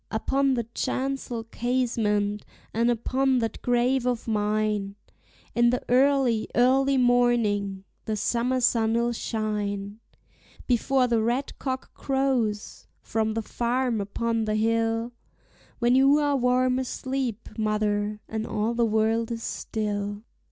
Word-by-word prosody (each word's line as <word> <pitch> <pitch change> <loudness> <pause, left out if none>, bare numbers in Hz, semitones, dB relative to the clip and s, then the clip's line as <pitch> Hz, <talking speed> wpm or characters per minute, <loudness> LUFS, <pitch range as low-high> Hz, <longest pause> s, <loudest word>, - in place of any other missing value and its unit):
Upon 270 +4 +1
the 235 - -1
chancel 260 -3 -2
casement, 225 -4 -1 0.3
and 230 +2 +2
upon 260 +3 +1
that 225 -2 -2
grave 245 +1 +1
of 245 -2 -2
mine, 210 -2 0 0.6
In 240 0 +4
the 250 +1 -1
early, 255 -3 +3
early 270 +3 +4
morning 235 -6 +2 0.2
the 220 - -1
summer 250 +4 0
sun'll 235 0 +2
shine, 210 -2 -3 0.7
Before 255 +2 +2
the 235 -2 +1
red 245 +5 -2
cock 260 -1 -4
crows 260 -6 -1 0.2
from 220 0 -1
the 225 - -1
farm 240 0 -1
upon 225 +2 -1
the 215 0 0
hill, 225 +1 0 0.7
When 240 0 +2
you 270 +3 +5
are 290 -1 +2
warm 255 0 +2
asleep, 260 -3 -3
mother, 210 -1 -1
and 220 0 -4
all 215 +2 -1
the 235 -1 +2
world 220 +1 +1
is 230 -1 -4
still. 205 -1 -3
235 Hz, 125 wpm, -26 LUFS, 215-255 Hz, 0.7 s, you